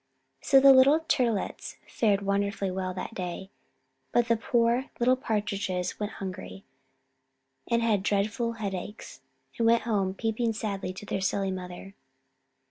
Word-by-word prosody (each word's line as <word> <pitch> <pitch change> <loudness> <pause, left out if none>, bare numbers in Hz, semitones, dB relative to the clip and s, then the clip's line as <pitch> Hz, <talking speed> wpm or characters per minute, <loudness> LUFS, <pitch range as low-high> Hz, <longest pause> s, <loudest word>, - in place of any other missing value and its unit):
So 270 - +5
the 275 0 +8
little 275 +5 +6
Turtlets 245 -10 -1
fared 205 -3 +1
wonderfully 200 0 -1
well 185 0 -3
that 190 - -5
day; 185 +1 -5 0.6
but 240 0 +2
the 230 - +5
poor 235 +3 +1
little 250 +2 +4
Partridges 205 -6 -2
went 210 +1 -3
hungry, 190 0 -7 1.0
and 235 0 +2
had 215 -4 +2
dreadful 210 +4 0
headaches, 205 -2 -6 0.4
and 230 - +3
went 230 0 +4
home 200 -4 0
peeping 225 +1 -1
sadly 205 -4 -3
to 190 +3 -9
their 195 - -3
silly 195 0 0
mother. 185 +1 -7
210 Hz, 135 wpm, -28 LUFS, 195-230 Hz, 1.0 s, the